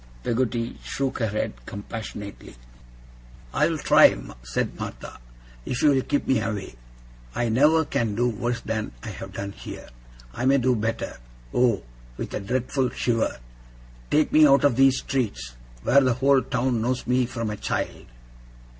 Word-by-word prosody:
Peggotty 120 -1 -1
shook 135 -1 -2
her 115 - +1
head 105 - -2
compassionately. 105 0 -7 1.0
'I'll - - +2
try,' - - +6 0.2
said - - -3
Martha, - - -7 0.4
'if 125 - -3
you'll 140 -3 +5
help 145 - +1
me 130 -4 +3
away. 105 - -4 0.6
I 120 - 0
never 150 +7 +4
can 110 -6 -1
do 120 +3 +2
worse 120 +1 -2
than 110 - -3
I - - -5
have - - -8
done 100 0 -4
here. - - -9 0.4
I 125 - -3
may 135 +1 +5
do 130 -1 +2
better. 115 +1 -3 0.3
Oh!' 120 - +2 0.3
with - - -5
a - - -1
dreadful 125 +5 -1
shiver, 115 -2 0 0.7
'take 150 0 +2
me 155 0 +8
out 140 0 +5
of 140 -5 +4
these 135 0 +5
streets, 60 - -2 0.3
where 140 +3 +5
the 130 -3 +2
whole 135 +1 +4
town 125 -1 0
knows 125 +2 -1
me 125 0 +2
from 115 -3 -3
a - - -3
child! - - -3
120 Hz, 155 wpm, -25 LUFS, 110-130 Hz, 1.0 s, me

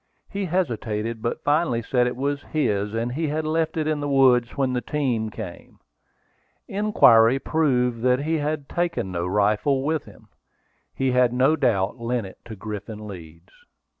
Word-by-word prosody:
He 200 -1 -2
hesitated; 115 - -2
but 115 +1 -3
finally 145 -6 +1
said 125 +1 +1
it 125 - -3
was 140 +2 -2
his, 105 -10 -1
and 115 +2 -1
he 155 +5 -2
had 155 +1 -2
left 160 +1 -1
it 155 - 0
in 155 -1 0
the 145 0 -3
woods 130 -3 +3
when 135 -2 +1
the 125 - -1
team 125 -8 -1
came. 105 -5 -9 0.9
Inquiry 135 - +5
proved 125 -6 0
that 125 +2 +2
he 160 +1 0
had 145 -1 -2
taken 170 - -2
no 85 0 -2
rifle 105 +8 +1
with 155 +1 -1
him. - - -17 0.7
He 135 -1 0
had 125 -1 +3
no 130 +5 +3
doubt 115 -7 0
lent 115 -1 -2
it 95 - -12
to 110 - -8
Griffin 105 +1 -7
Leeds. 85 -3 -11
125 Hz, 165 wpm, -24 LUFS, 110-150 Hz, 0.9 s, Inquiry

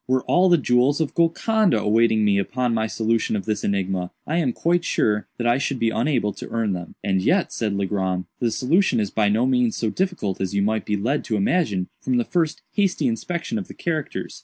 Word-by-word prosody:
Were 130 0 +1
all 185 +1 +3
the 175 - +6
jewels 130 +1 +2
of 160 -3 -1
Golconda 180 - +2
awaiting 110 0 +3
me 100 -1 +3
upon 125 +4 -1
my 110 -1 0
solution 110 0 0
of 100 - -3
this 105 -1 -2
enigma, 95 -2 -1 0.2
I 160 - -1
am 140 -7 +1
quite 170 +6 0
sure 105 -8 0
that 120 - -3
I 120 +2 +3
should 140 -1 -1
be 115 -2 +1
unable 115 -4 0
to - - -9
earn 115 -3 -1
them." 85 -2 -7
"And 95 -2 +1
yet," 180 - +1
said 105 -3 -2
Legrand, 95 -2 -1
"the 120 - +1
solution 140 - +2
is 105 -2 -1
by 105 -2 +2
no 110 +4 +2
means 125 -3 +2
so 110 -2 -1
difficult 180 - -2
as 95 +1 -2
you 100 - +2
might 110 +1 -1
be 105 - 0
lead 130 +9 -1
to 115 - -1
imagine 100 - 0
from 130 -1 0
the 120 - +1
first 165 -3 -1
hasty 195 0 0
inspection 225 -3 -2
of 195 - -7
the - - -11
characters. 160 -4 -4
115 Hz, 220 wpm, -23 LUFS, 105-155 Hz, 0.2 s, the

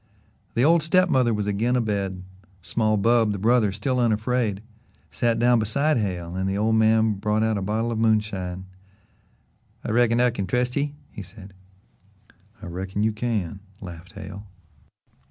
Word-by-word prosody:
The 120 - +3
old 165 +1 +5
step 185 +4 +3
mother 125 -6 +3
was 105 -2 -1
again 110 +5 0
a - - +3
bed; 100 -5 -2 0.4
small 110 +2 0
Bub, 115 0 +3
the - - -4
brother, 110 +1 +3
still 125 +6 -1
unafraid, 110 -2 0 0.5
sat 115 -1 0
down 120 0 +4
beside 140 +8 +1
Hale 90 -5 -3
and 95 +1 -1
the 95 - -1
old 110 +2 +1
man 110 0 +3
brought 105 +2 0
out 110 0 +1
a 100 - -2
bottle 110 +4 -1
of 110 - -2
moonshine. 100 -5 0 1.2
"I - - -3
reckon 120 0 +3
I 125 0 +3
can 100 -4 -3
still 125 - 0
trust 125 0 -1
ye," 145 0 -1 0.2
he - - -8
said. 95 +1 -13 1.1
"I - - -6
reckon 95 +4 -4
you 110 - +2
can," 105 -5 -3 0.2
laughed 90 -2 -10
Hale. 95 +2 -9
110 Hz, 170 wpm, -24 LUFS, 100-120 Hz, 1.2 s, old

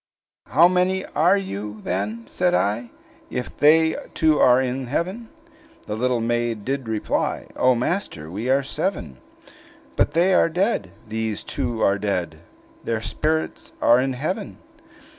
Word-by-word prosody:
"How 170 +3 +6
many 185 +1 +1
are 175 +6 +3
you, 105 - -5
then," 105 +5 -3
said 180 +8 +1
I, 110 +4 0 0.4
"If 125 - -5
they 160 +2 +4 0.2
two 155 -2 +3
are 125 0 +6
in 130 0 -2
heaven?" 185 - -3 0.6
The 105 - -4
little 125 +1 0
maiden 120 -2 -1
did 135 +1 -3
reply, 110 -1 -1
"O 130 0 +3
master! 115 - -3
we 110 +7 -3
are 135 +1 +3
seven." 140 - -3 0.8
"But - - +1
they 180 +3 +3
are 175 - +4
dead; 180 - 0 0.2
these 110 -1 -3
two 115 -2 -2
are 100 0 +3
dead! 90 -6 -2 0.4
Their 115 -1 -2
spirits 155 +6 -2
are 120 +1 +5
in 130 +1 0
heaven!" 185 - -4
125 Hz, 140 wpm, -23 LUFS, 110-165 Hz, 0.8 s, How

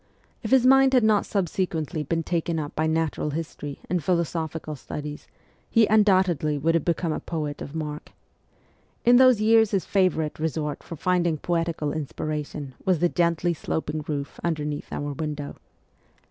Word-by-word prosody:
If 220 - -4
his 260 0 +5
mind 270 0 +6
had 250 - +5
not 215 -2 +3
subsequently 175 -4 -1
been 165 +3 -1
taken 170 0 -1
up 150 -2 -4
by 155 +1 +1
natural 160 -1 0
history 150 -2 -5
and 175 -2 -1
philosophical 160 -2 -1
studies, 150 +1 -7 0.4
he 230 -2 +5
undoubtedly 185 -8 +3
would 160 +4 +1
have 165 -3 +1
become 170 -1 0
a - - -3
poet 150 -3 -4
of 140 - -7
mark. 150 -1 -5 0.9
In 240 +1 +7
those 255 -4 +6
years 220 0 +5
his 195 -3 0
favourite 170 -7 +1
resort 155 -2 -2
for 165 - -8
finding 175 -1 +1
poetical 165 -3 -1
inspiration 150 -1 -4
was 185 -2 +2
the 175 +3 +2
gently 170 0 +1
sloping 155 -1 -3
roof 140 -2 -4
underneath 150 -3 -3
our 145 0 -3
window. 150 0 -5
160 Hz, 155 wpm, -25 LUFS, 150-185 Hz, 0.9 s, In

